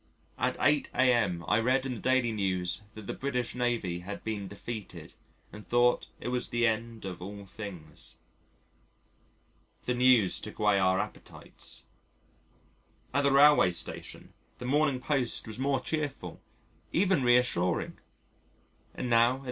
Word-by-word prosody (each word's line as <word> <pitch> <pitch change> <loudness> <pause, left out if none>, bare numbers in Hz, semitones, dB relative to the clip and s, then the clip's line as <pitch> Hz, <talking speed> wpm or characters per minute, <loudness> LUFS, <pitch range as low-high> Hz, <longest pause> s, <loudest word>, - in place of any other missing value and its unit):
At - - 0
8 145 -1 +2
a.m. 115 -10 +2
I 105 - +3
read 130 +3 +2
in 130 - -2
the 115 - -6
Daily 130 -2 +2
News 95 -3 -1
that 110 -2 -9
the - - -4
British 125 -3 -2
Navy 120 -8 -1
had 95 +4 -7
been 105 -3 -3
defeated, 105 +2 -8 0.4
and 105 - -9
thought 120 +2 +2
it - - -4
was 125 0 -1
the 120 0 +1
end 115 -1 -2
of 90 -2 -6
all 100 +2 -8
things. 90 -7 -9 1.7
The 125 - 0
news 125 -6 +4
took 105 - -8
away 105 -2 +3
our 95 0 +3
appetites. - - -6 1.3
At 140 +1 +2
the 140 - +4
railway 145 -7 +7
station, - - -6 0.2
the 125 - -7
Morning 140 0 +2
Post 130 -2 -1
was 110 +2 -8
more 135 0 +1
cheerful, 140 - -4 0.5
even 185 -3 +2
reassuring, 120 -8 +2 1.0
and - - -3
now 115 0 +5
at - - -8
6. - - -11
120 Hz, 145 wpm, -29 LUFS, 100-130 Hz, 1.7 s, railway